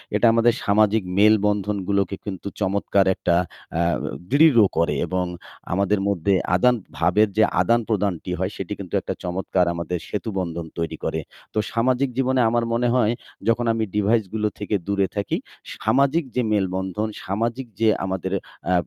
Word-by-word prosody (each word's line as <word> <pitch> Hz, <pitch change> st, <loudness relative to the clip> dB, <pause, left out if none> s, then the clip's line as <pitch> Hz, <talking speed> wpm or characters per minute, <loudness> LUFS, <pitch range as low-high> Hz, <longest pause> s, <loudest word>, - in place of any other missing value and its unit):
এটা 105 Hz, -, +3 dB
আমাদের 115 Hz, 0 st, +4 dB
সামাজিক 105 Hz, 0 st, +3 dB
মেলবন্ধনগুলোকে 100 Hz, -2 st, +2 dB
কিন্তু 100 Hz, -2 st, -5 dB
চমৎকার 100 Hz, 0 st, +2 dB
একটা 85 Hz, -, +1 dB, 0.4 s
আ -, -, +3 dB, 0.5 s
দৃঢ় 145 Hz, -5 st, +6 dB, 0.2 s
করে 85 Hz, -, +2 dB
এবং 90 Hz, 0 st, -1 dB, 0.5 s
আমাদের 100 Hz, +2 st, +1 dB
মধ্যে 100 Hz, 0 st, +1 dB, 0.2 s
আদান 125 Hz, +6 st, +4 dB, 0.2 s
ভাবের 105 Hz, +1 st, +3 dB
যে 110 Hz, -, +6 dB, 0.2 s
আদান-প্রদানটি 100 Hz, -4 st, 0 dB
হয় 95 Hz, +2 st, -1 dB
সেটি 95 Hz, +2 st, -4 dB
কিন্তু 95 Hz, -3 st, -8 dB
একটা -, -, -3 dB
চমৎকার 90 Hz, 0 st, 0 dB
আমাদের 85 Hz, +1 st, -3 dB
সেতুবন্ধন 90 Hz, -6 st, -3 dB
তৈরি 85 Hz, -2 st, -3 dB
করে। 80 Hz, -, -1 dB, 0.3 s
তো -, -, -5 dB, 0.2 s
সামাজিক 130 Hz, +3 st, +1 dB
জীবনে 130 Hz, -1 st, +2 dB
আমার 120 Hz, 0 st, +1 dB
মনে 120 Hz, +1 st, +1 dB
হয় 115 Hz, -2 st, +3 dB, 0.3 s
যখন 115 Hz, +1 st, +2 dB
আমি 115 Hz, -, -1 dB
device 105 Hz, 0 st, +2 dB
গুলো 110 Hz, -1 st, 0 dB
থেকে 105 Hz, 0 st, -1 dB
দূরে 100 Hz, -1 st, +1 dB
থাকি, 100 Hz, -1 st, -1 dB, 0.5 s
সামাজিক 140 Hz, +5 st, +3 dB
যে 125 Hz, -, +2 dB
মেলবন্ধন, 95 Hz, +1 st, -1 dB, 0.2 s
সামাজিক 115 Hz, +6 st, -2 dB
যে 115 Hz, -, +3 dB, 0.2 s
আমাদের 95 Hz, 0 st, -3 dB, 0.4 s
আ -, -, +4 dB
105 Hz, 145 wpm, -23 LUFS, 95-115 Hz, 0.5 s, দৃঢ়